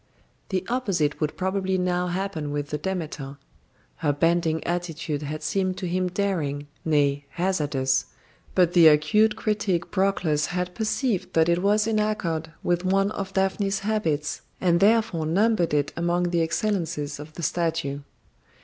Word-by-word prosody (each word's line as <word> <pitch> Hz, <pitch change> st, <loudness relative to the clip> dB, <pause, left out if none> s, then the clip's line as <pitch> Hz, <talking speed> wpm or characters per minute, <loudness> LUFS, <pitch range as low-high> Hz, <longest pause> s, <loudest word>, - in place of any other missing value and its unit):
The 185 Hz, -1 st, -1 dB
opposite 195 Hz, -, 0 dB
would 155 Hz, 0 st, -1 dB
probably 190 Hz, 0 st, 0 dB
now 180 Hz, 0 st, 0 dB
happen 180 Hz, -4 st, -3 dB
with 145 Hz, 0 st, -3 dB
the 150 Hz, -, -2 dB
Demeter. 155 Hz, -6 st, -4 dB, 0.6 s
Her 150 Hz, -, +1 dB
bending 165 Hz, +2 st, +1 dB
attitude 165 Hz, -4 st, -3 dB
had 150 Hz, +1 st, -5 dB
seemed 185 Hz, +3 st, 0 dB
to -, -, -4 dB
him 185 Hz, +1 st, 0 dB
daring, 175 Hz, -7 st, -1 dB, 0.2 s
nay, 145 Hz, -2 st, +1 dB
hazardous; 145 Hz, -7 st, 0 dB, 0.5 s
but 175 Hz, -2 st, +4 dB
the 170 Hz, -2 st, +8 dB
acute 210 Hz, +9 st, +4 dB
critic 210 Hz, -5 st, -1 dB
Proclus 185 Hz, -6 st, +1 dB
had 180 Hz, 0 st, -3 dB
perceived 220 Hz, -1 st, -1 dB
that 165 Hz, +1 st, +3 dB
it 170 Hz, +1 st, +2 dB
was 210 Hz, +2 st, +3 dB
in 220 Hz, -1 st, +1 dB
accord 170 Hz, -7 st, -1 dB
with 175 Hz, 0 st, +1 dB
one 195 Hz, +2 st, +2 dB
of 195 Hz, -2 st, -5 dB
Daphne's 195 Hz, +1 st, 0 dB
habits, 165 Hz, -8 st, -1 dB, 0.2 s
and 170 Hz, -2 st, +3 dB
therefore 210 Hz, -6 st, +3 dB
numbered 200 Hz, +1 st, +2 dB
it 145 Hz, -1 st, 0 dB
among 175 Hz, +1 st, 0 dB
the 170 Hz, -1 st, +2 dB
excellences 165 Hz, -5 st, -1 dB
of 150 Hz, +1 st, -9 dB
the 170 Hz, -, -7 dB
statue. 165 Hz, -3 st, -1 dB
175 Hz, 150 wpm, -25 LUFS, 155-195 Hz, 0.6 s, the